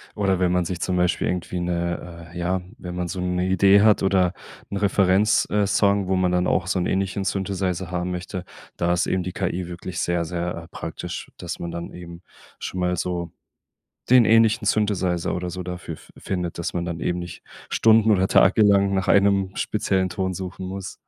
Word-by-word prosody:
Oder 95 -3 +1
wenn 90 -1 +2
man 90 -1 +1
sich 90 0 -4
zum 90 -1 0
Beispiel 90 0 +1
irgendwie 90 0 -2
'ne 85 -1 -4
äh, 85 - -8
ja, 90 +1 -1 0.2
wenn 90 0 -7
man 90 -1 -2
so 90 +1 -4
'ne 90 0 0
Idee 95 +2 +5
hat 105 -1 +4
oder 95 -2 +2 0.4
'n - - -5
Referenz, 100 +1 +3
äh, 105 -1 +2
Song, 100 0 +2
wo 95 - +1
man 90 -1 +2
dann 90 0 +2
auch 90 - +1
so 95 0 0
'n 90 - 0
ähnlichen 95 +1 -1
Synthesizer 95 -2 -2
haben 90 0 -2
möchte, 90 +1 -5 0.3
da 85 0 +1
ist 90 - +1
eben 95 -1 0
die 90 - -4
KI 90 -2 -2
wirklich 85 0 -6
sehr, 85 -1 0
sehr, 85 0 -4
äh, - - -16
praktisch, - - -7
dass - - -6
man 85 - -5
dann 85 0 -6
eben 85 -1 -10 0.4
schon 90 - -5
mal 90 0 +1
so 85 -2 -3 0.8
den 125 -2 +7
ähnlichen 115 -1 +4
Synthesizer 95 -5 +1
oder 90 0 -3
so 90 +1 -5
dafür 90 -2 -6
fi - - -19
findet, 90 -3 -4
dass 85 - -3
man 85 -1 -2
dann 85 -1 -4
eben 90 - -1
nicht 85 -1 -8 0.3
stunden 110 0 +4
oder 95 -2 +4
tagelang 100 -1 +4
nach 95 -1 -1
einem 100 -1 +3
speziellen 95 -3 0
Ton 95 0 -2
suchen 95 +1 -6
muss. 95 0 -6
90 Hz, 200 wpm, -23 LUFS, 90-95 Hz, 0.8 s, den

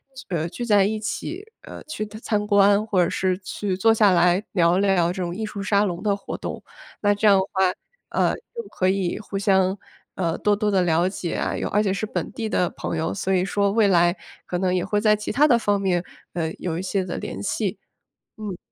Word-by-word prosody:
聚 265 - -10
呃， 170 -2 -1
聚 240 +7 -5
在 205 -4 +4
一 215 +2 -1
起， 345 - -5 0.2
呃， - - -10
去 260 -9 -5
参 210 0 -3
观 200 0 +4
或 190 -4 +3
者 170 - 0
是 185 -1 0
去 195 0 -3
坐 225 +4 +4
下 215 -3 +4
来 180 +2 +3
聊 175 -2 +3
聊 190 -4 +2
这 185 - -5
种 175 -1 -3
艺 220 +2 -3
术 210 -1 -6
沙 200 0 +2
龙 180 -4 -2
的 205 -2 +1
活 200 - -7
动。 - - -6 0.4
那 205 -1 +3
这 205 +1 +1
样 200 -1 +7
的 190 - +2
话， 190 -2 +2 0.4
呃， - - +1
就 470 0 -9
可 185 - 0
以 190 -2 -1
互 210 -2 -5
相， 190 -1 +2 0.4
呃， 170 -3 -1
多 210 0 +2
多 210 0 0
地 190 -2 +3
了 170 0 +2
解 180 -3 -4
啊， - - -1
有 - - -2
而 210 +1 +2
且 195 -2 +1
是 200 +2 -2
本 225 - -4
地 230 -4 -4
的 180 -4 +1
朋 - - -5
友， 160 +1 -1
所 190 -1 -1
以 180 -1 +2
说 200 0 +1
未 215 0 +3
来 175 -1 +4 0.3
可 180 - -3
能 185 -1 +1
也 180 -1 +1
会 210 - 0
在 215 -1 +4
其 210 - -4
他 295 +4 +5
的 245 -5 +5
方 205 -3 +1
面， 180 -3 0 0.3
呃， 160 -2 -2
有 170 -2 -3
一 - - -3
些 190 +1 -1
的 180 -1 -5
联 - - -6
系。 - - -2 0.6
嗯。 205 -4 -5
195 Hz, 250 characters per minute, -23 LUFS, 180-210 Hz, 0.6 s, 样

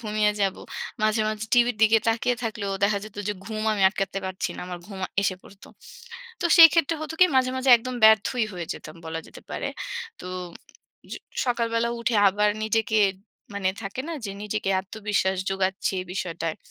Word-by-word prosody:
ঘুমিয়ে 215 -2 +1
যাবো। 195 -1 0 0.4
মাঝে, 215 +1 +2
মাঝে 215 0 -3
টিভির 240 -2 +4
দিকে 220 +1 +6
তাকিয়ে 235 +2 +1
থাকলেও 210 -3 -3
দেখা 200 0 +2
যেত 215 - -12
যে - - +1
ঘুম 215 +1 -4
আমি 200 -2 -1
আটকাতে 195 0 -3
পারছি 190 0 -3
না। - - -7
আমার 180 -1 -6
ঘুম 195 -2 -9 0.2
এসে 195 -2 +1
পড়ত। 195 - -16 0.8
তো - - -3
সেক্ষেত্রে 330 -1 +7
হতো 310 +1 -5
কি 365 - +9
মাঝে, 255 -1 +3
মাঝে 260 0 +2
একদম 255 +2 -6
ব্যর্থই 220 +2 +5
হয়ে 175 -2 -5
যেতাম 155 +2 -11
বলা 160 0 -4
যেতে - - -13
পারে। - - -3 0.5
তো - - -8 0.9
স - - -2 0.3
সকালবেলা 230 -1 0
উঠে 235 0 0
আবার 210 +2 +2 0.2
নিজেকে 220 0 +1 0.6
মানে 195 -2 0
থাকে 200 +5 -5
না 335 - -3
যে 200 - -3
নিজেকে 210 -1 -2
আত্মবিশ্বাস 200 -1 -1
জোগাচ্ছি 190 0 -1
এই 185 - -6
বিষয়টায়। 165 -4 -3
210 Hz, 170 wpm, -25 LUFS, 195-230 Hz, 0.9 s, কি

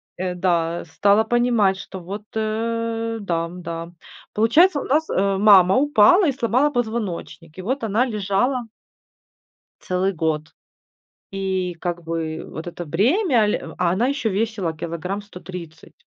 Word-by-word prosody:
э, 180 0 -3
да, 170 -2 0
стала 200 +6 +2
понимать, 235 -4 +2
что 190 0 -8
вот, 195 +4 -7
э, 230 +1 -2
дам, 175 -2 -3
да. 170 0 -6 0.4
Получается 290 - +4
у - - -5
нас, 310 +4 +1
э, 195 0 +1
мама 195 -2 +6
упала 290 - +5
и 295 - +3
сломала 255 +3 +1
позвоночник. 220 - -4
И - - -5
вот 250 +6 -2
она 225 +4 +2
лежала 215 +3 0 1.2
целый 185 +2 -1
год. 160 -2 -2 0.8
И 190 -2 -2
как 175 -1 -4
бы 160 -1 -4
вот 160 - -8
это 175 0 -7
бремя, 240 - +2
ле 210 - 0 0.2
а 180 -1 +2
она 200 +8 +1
ещё 275 -5 -1
весила 205 -4 -1
килограмм 170 +5 -4
130. 180 -5 -10
200 Hz, 140 wpm, -22 LUFS, 175-230 Hz, 1.2 s, мама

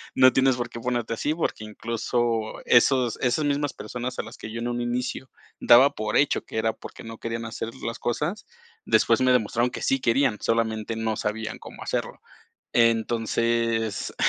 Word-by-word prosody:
no 130 0 +6
tienes 135 -1 +3
por 120 -1 -3
qué 120 - -8
ponerte 120 -1 -2
así". 150 +6 -1
Porque, 160 -8 -2
incluso, 115 +1 -2
esos 125 -1 +4
esas 130 +4 +1
mismas 145 0 0
personas 125 +3 -6
a - - -1
las 115 +2 -11
que 110 - -8
yo 115 - -5
en 120 - -2
un 120 0 -2
inicio 125 +2 -3 0.3
daba 130 +4 +7
por 105 0 -3
hecho 145 - +2
que - - -7
era 110 0 +1
porque - - -11
no 115 0 -8
querían 115 0 -4
hacer 115 0 -5
las 115 - -4
cosas, 150 - -2 0.4
después - - +3
me 130 0 +4
demostraron 120 0 +2
que - - -6
sí 135 - +1
querían, 120 -2 +2
solamente 115 -1 0
no 110 -1 -1
sabían 110 +1 -3
cómo - - -12
hacerlo. - - -3 0.6
Entonces, 115 -1 +1
115 Hz, 175 wpm, -25 LUFS, 115-125 Hz, 0.6 s, daba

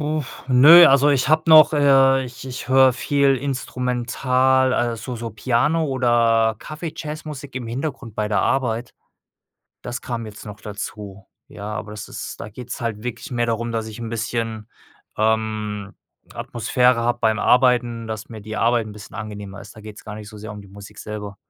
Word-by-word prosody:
uff, 150 -2 -4
nö, 150 +7 +9
also, 140 +1 +5
ich 135 -2 +1
habe 155 +1 +4
noch, 155 0 +8
äh 135 -2 +4
ich 120 0 -10
ich 125 -1 -7
höre 130 0 +6
viel 140 +2 +2
Instrumental, 130 0 0
also, 120 +1 -2
so - - -6
so 115 0 -5
Piano 130 +9 +1
oder 115 -4 +2
Kaffeejazzmusik 155 -3 -7
im 125 -2 -4
Hintergrund 125 -1 -5
bei 105 -1 -2
der 105 - +1
Arbeit. 120 -3 -1 0.9
Das 120 0 -5
kam 120 -3 -5
jetzt 105 0 -11
noch 105 0 -9
dazu. 100 -1 -8 0.2
Ja, 105 +1 -7
aber 105 0 -6
das 105 -1 -7
ist - - -7
da - - -6
geht's 120 +3 -8
halt 115 -3 -3
wirklich 125 +5 -6
mehr 120 -1 0
darum, 115 0 -2
dass 110 -1 -3
ich 110 +1 -9
'n 115 - -5
bisschen, 115 -1 -3 0.5
ähm, 110 -2 -1 0.4
Atmosphäre 125 +1 +1
habe 120 +1 0
beim 110 -2 +1
Arbeiten, 120 -2 +2
dass 110 0 -6
mir 110 -2 -9
die 110 +1 -7
Arbeit 115 -1 +2
'n 105 - -9
bisschen 105 +1 -11
angenehmer 105 -2 -7
ist. - - -12
Da 110 - -12
geht's 105 0 -11
gar 105 - -7
nicht 105 -1 -9
so 110 - -12
sehr 105 0 -8
um 105 - -9
die 100 - -16
Musik 100 +1 -13
selber. 105 -1 -7
115 Hz, 180 wpm, -21 LUFS, 110-130 Hz, 0.9 s, nö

